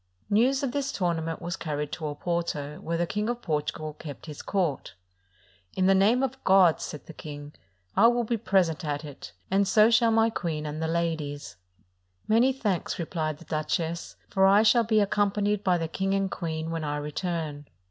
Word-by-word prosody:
News 255 +6 +3
of 265 - 0
this 280 +1 -2
tournament 165 -3 -2
was 175 0 -3
carried 150 -2 -4
to 160 - -5
Oporto, 150 -1 -3
where 165 +1 -2
the 175 - +1
King 210 +5 -2
of 240 0 -3
Portugal 155 -1 -2
kept 145 -2 -9
his 150 -3 -8
court. 180 -8 -2 0.8
"In 185 - +1
the 195 - +5
name 215 +7 +4
of 265 0 -3
God," 190 -4 +5
said 150 - -6
the 165 - -10
king, 145 -1 -9 0.4
"I 230 - +7
will 240 0 +2
be 235 +1 -1
present 190 -8 +1
at 150 0 -3
it, 135 -11 -10 0.2
and 195 +1 +3
so 215 +3 +5
shall 230 0 +5
my 225 0 +3
queen 160 -7 -3
and 150 +1 -4
the 160 - 0
ladies." 160 -4 -2 0.7
"Many 235 +4 +4
thanks," 210 -11 -2
replied 160 -3 -3
the 170 - -15
duchess, 165 +2 -2
"for 190 0 +3
I 200 +2 +6
shall 230 +2 +5
be 220 -1 +2
accompanied 205 0 +1
by 180 -3 +3
the 165 -1 -2
king 195 +4 -1
and 195 -1 0
queen 160 -2 -3
when 165 -1 -3
I 145 0 -2
return." 150 -1 -4
170 Hz, 190 wpm, -27 LUFS, 155-210 Hz, 0.8 s, I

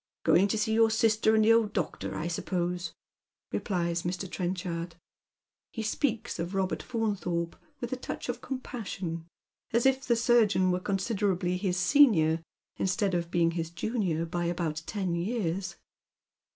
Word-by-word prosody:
" - - -65
Going 195 +3 +5
to 210 - 0
see 215 +1 +1
your 225 0 +5
sister 220 0 +3
and 215 -1 +4
the 225 - +7
old 225 -2 +2
doctor, 180 -6 -2
I 160 - -2
suppose," 175 0 -2 0.6
replies 170 -4 -1
Mr. 180 +2 -3
Trenchard. 175 -2 -3 0.7
He 225 - -5
speaks 230 -2 -1
of 175 +3 -3
Robert 190 -1 0
Faunthorpe 195 -8 -2 0.2
with 240 +1 -4
a - - -2
touch - - -6
of 245 0 -3
compassion, 195 - -5 0.4
as 235 +2 +2
if 265 0 +3
the 240 - +2
surgeon 225 -6 +4
were 180 - +1
considerably 195 -2 0
his 180 -1 -1
senior, 175 - +5 0.4
instead 190 +1 0
of 170 -1 -1
bemg 170 -1 +2
his 165 -1 -2
junior 170 -2 -1
by 175 +1 -2
about 170 -2 -1
ten 190 -5 -2
years. 185 0 -2
190 Hz, 150 wpm, -29 LUFS, 175-220 Hz, 0.7 s, the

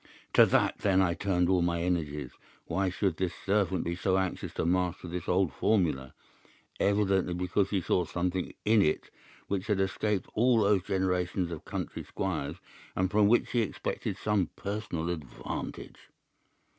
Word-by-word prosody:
To - - +7
that - - +2
then 95 -2 +3
I 90 -3 +3
turned 90 -1 +1
all 90 -1 +3
my 85 -1 0
energies. 75 -7 -2 0.3
Why 95 -1 0
should 90 -2 -1
this 90 -2 -1
servant 95 -2 +1
be 85 +1 -2
so 95 +1 +1
anxious 95 -2 -2
to - - -1
master 90 0 0
this 90 0 -5
old 90 -5 +2
formula? 80 -10 +1 0.6
Evidently 100 -3 +2
because 90 +2 0
he 100 -3 0
saw 90 +1 +1
something 90 +2 -2
in 110 0 +5
it 75 - 0 0.3
which 100 0 -2
had 105 -3 +1
escaped 95 0 0
all 120 0 +4
those 100 -1 +3
generations 90 -2 0
of 80 - -7
country - - -4
squires, - - -3 0.4
and 95 0 0
from 105 0 +4
which 120 +3 +3
he 120 - +2
expected 110 - -3
some 105 -5 +1
personal 100 -5 -3
advantage. 80 -7 -6
95 Hz, 155 wpm, -30 LUFS, 85-100 Hz, 0.6 s, To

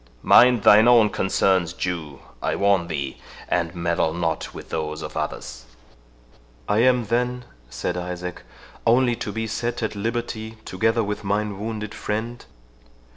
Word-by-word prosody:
Mind 125 -3 +6
thine 110 +3 +7
own 115 -4 +6
concerns, 95 -3 +1
Jew, 85 -6 -4 0.2
I - - 0
warn 100 -3 +2
thee, 70 -5 -4 0.3
and 85 0 -1
meddle 85 -2 0
not 85 -2 -2
with - - -10
those 75 -1 -3
of - - -7
others." - - -5 1.0
"I 105 +1 +2
am, 125 -1 +3
then," 125 +2 -1 0.2
said 85 +8 -3
Isaac, 90 0 -5 0.5
"only 120 +1 +4
to 115 -3 -4
be 110 +2 -3
set 115 +2 -3
at 110 - -2
liberty, 110 +1 -4
together 115 +4 +1
with 105 +1 -4
mine 100 0 -1
wounded 110 -1 -4
friend?" 115 +3 -4
105 Hz, 140 wpm, -23 LUFS, 90-115 Hz, 1.0 s, thine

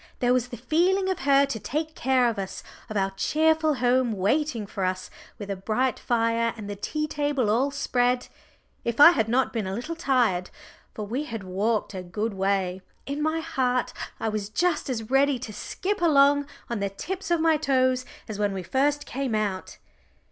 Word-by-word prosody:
There 245 0 +2
was 250 -1 +1
the 245 - -8
feeling 360 - +2
of 375 - -3
her 275 0 +4
to 275 -5 -4
take 310 +9 -3
care 260 -3 +2
of 225 -3 -1
us, 190 -1 -5 0.3
of 215 - -3
our 195 0 +1
cheerful 315 +8 +2
home 250 -1 +2
waiting 225 +4 0
for 195 -1 -5
us, 185 0 -2 0.3
with 205 -1 -6
a - - -1
bright 225 +7 -1
fire 230 -1 +1
and 210 -2 -7
the 205 - -4
tea 305 +9 -2
table 290 -7 0
all 255 +6 +2
spread. 250 -3 0 0.6
If 235 +1 -2
I 315 +4 +11
had 225 -10 +1
not 255 +3 +1
been 220 -5 -2
a 190 - -3
little 275 +9 -4
tired 245 - +1 0.5
for 210 - -4
we 250 +8 -3
had 225 -7 -6
walked 205 +4 -1
a 185 - -4
good 210 +5 -3
way 190 -1 0 0.2
in 280 +2 -3
my 315 +1 0
heart 255 -6 0 0.3
I - - -2
was 210 -2 -2
just 325 +5 0
as 225 -2 -4
ready 275 0 +4
to 235 -3 -7
skip 390 - -3
along 285 -3 +4 0.2
on 235 -3 -3
the 200 0 -1
tips 350 - -5
of 340 -1 +2
my 320 -1 +3
toes 255 -3 +2 0.2
as 215 -3 -6
when 205 -1 +1
we 190 -1 -4
first 285 +9 +1
came 265 -3 -2
out. 205 -3 -2
245 Hz, 195 wpm, -26 LUFS, 210-290 Hz, 0.6 s, I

